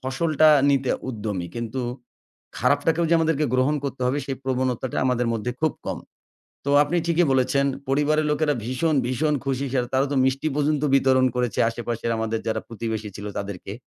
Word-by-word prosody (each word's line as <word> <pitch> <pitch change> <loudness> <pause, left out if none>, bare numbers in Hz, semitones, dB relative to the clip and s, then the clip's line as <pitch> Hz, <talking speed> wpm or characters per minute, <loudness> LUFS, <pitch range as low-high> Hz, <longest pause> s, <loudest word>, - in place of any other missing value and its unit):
ফসলটা 155 +4 +2 0.2
নিতে 135 -2 +1 0.2
উদ্যমী 105 -7 -3
কিন্তু 120 +2 -4 0.8
খারাপটাকেও 145 +6 +2
যে 170 - +5
আমাদেরকে 160 -2 +1
গ্রহণ 130 +4 +2
করতে 135 -1 -4
হবে 135 +3 0
সেই 135 - -3
প্রবণতাটা 130 -1 -1
আমাদের 125 -1 +1
মধ্যে 115 +2 -2
খুব 155 -1 +2
কম। - - -3 0.7
তো - - -1
আপনি 165 +4 -1
ঠিকই 170 +1 +3
বলেছেন 130 +1 +2 0.2
পরিবারের 150 +2 +2
লোকেরা 150 0 +1
ভীষণ, 140 +6 0
ভীষণ 140 +5 0
খুশি 135 0 -1
সেটা 125 -2 0
তারা 135 +1 +3
তো - - 0
মিষ্টি 135 +3 0
পর্যন্ত 150 0 +1
বিতরণ 130 -1 +4
করেছে 125 -3 -1
আশেপাশের 115 0 -3
আমাদের 110 0 -1
যারা 110 - -1
প্রতিবেশী 110 -2 -4
ছিল 100 - -7
তাদেরকে। 100 -1 -6
130 Hz, 165 wpm, -24 LUFS, 120-150 Hz, 0.8 s, যে